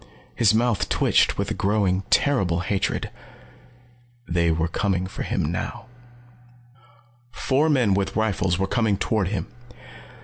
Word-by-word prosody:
His 110 -3 +3
mouth 115 -1 +1
twitched - - +2
with - - -2
a - - +1
growing 100 -2 +1
terrible 95 -12 +2
hatred. 95 +1 -2 1.2
They 85 -1 +1
were 80 +1 0
coming 95 +1 -1
for 95 - -7
him - - -1
now. - - -5 1.4
Four 135 +5 0
men 125 -9 +3
with 100 0 -1
rifles 100 -5 0
were 95 - 0
coming 110 -1 0
toward 105 -1 0
him. 100 +1 -3
100 Hz, 130 wpm, -23 LUFS, 90-110 Hz, 1.4 s, His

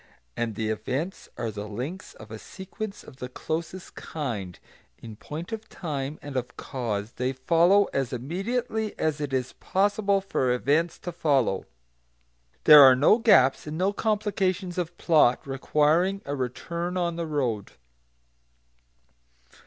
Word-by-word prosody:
And 115 -2 -2
the 110 +1 -2
events 130 - -3
are 115 -2 -2
the 105 0 -6
links 130 - -6
of 110 0 -13
a 110 - -7
sequence 195 - -8
of 130 - -14
the 125 -2 -6
closest 165 +6 -5
kind; 110 - -5 0.4
in 110 -2 -10
point 155 - -7
of 220 0 -6
time 150 -4 -4
and 145 -1 -7
of 125 -1 -3
cause 115 -5 -3
they 125 +2 -1
follow 170 +9 +4
as 135 -3 -1
immediately 215 - -3
as 155 -1 -1
it 145 -2 -3
is 130 -1 -1
possible 200 +1 +1
for 160 -10 0
events 145 +7 +1
to 175 - -6
follow. 140 - +1 1.0
There 150 -1 +10
are 130 -2 +9
no 150 - +5
gaps, 135 - +4
and 150 +1 -4
no 190 +3 +1
complications 200 -4 -1
of 170 -2 -4
plot 150 -7 +3
requiring 155 +8 +1
a 140 - -3
return 170 +8 -3
on 170 -2 0
the 170 -1 -3
road. 125 -9 -2
150 Hz, 145 wpm, -26 LUFS, 125-185 Hz, 1.0 s, There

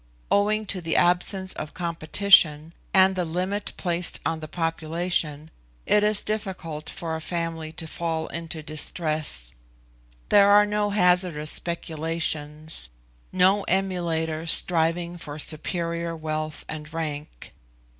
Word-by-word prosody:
Owing 215 +1 +2
to 190 -2 -4
this 165 -1 -1
absence 185 +2 +2
of 150 - -7
competition, 165 -2 +3 0.2
and 190 0 +5
the 180 - 0
limit 185 +5 -2
placed 175 -1 0
on 165 -1 -1
the 155 - -7
population, 165 -1 -2 0.3
it 210 - +4
is 210 0 +2
difficult 185 -8 -4
for 165 -1 -4
a 160 - -5
family 165 -2 -3
to 160 - -6
fall 160 0 -3
into 165 -1 -6
distress; 155 - -2 0.8
there 200 -1 +6
are 205 +1 +7
no 210 0 0
hazardous 180 -6 +3
speculations, 160 - -1 0.4
no 190 +2 +4
emulators 170 -4 -1
striving 170 +1 +3
for 145 -2 -7
superior 170 +2 -2
wealth 155 -1 -4
and 150 0 -7
rank. 150 - -5
165 Hz, 120 wpm, -25 LUFS, 155-185 Hz, 0.8 s, are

